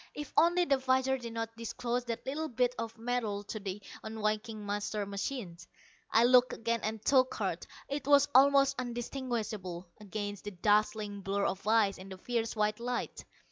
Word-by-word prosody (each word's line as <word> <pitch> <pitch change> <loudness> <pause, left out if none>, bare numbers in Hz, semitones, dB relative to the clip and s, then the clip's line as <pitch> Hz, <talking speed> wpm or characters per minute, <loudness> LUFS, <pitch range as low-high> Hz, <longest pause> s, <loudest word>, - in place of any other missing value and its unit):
If 295 -2 -6
only 350 +2 +4
the 275 -4 +2
visor 260 0 +2
did 235 -2 -7
not 225 0 -4
disclose 240 +2 -3
that 230 -1 -4
little 300 +4 -2
bit 250 -1 +1
of 230 0 -5
metal 225 -3 -2
to 215 +1 -6
the 200 0 -5 0.2
unwinking 215 0 -2
master 205 0 -2
machine! 200 -2 -4 0.5
I 225 - +5
looked 250 +1 +5
again 230 0 -1
and 215 0 -4
took 260 -2 +4
heart. - - -2 0.2
It 280 0 -4
was 285 0 +6
almost 275 +1 +6
undistinguishable 235 -7 -4
against 205 -1 -5
the 205 - -4
dazzling 210 0 +1
blur 200 +1 0
of 195 +2 -3
ice 215 -3 +3
in 190 +1 -10
the 190 - -8
fierce 230 +3 -2
white 210 0 +1
light. 245 +1 -3
225 Hz, 170 wpm, -32 LUFS, 205-250 Hz, 0.5 s, was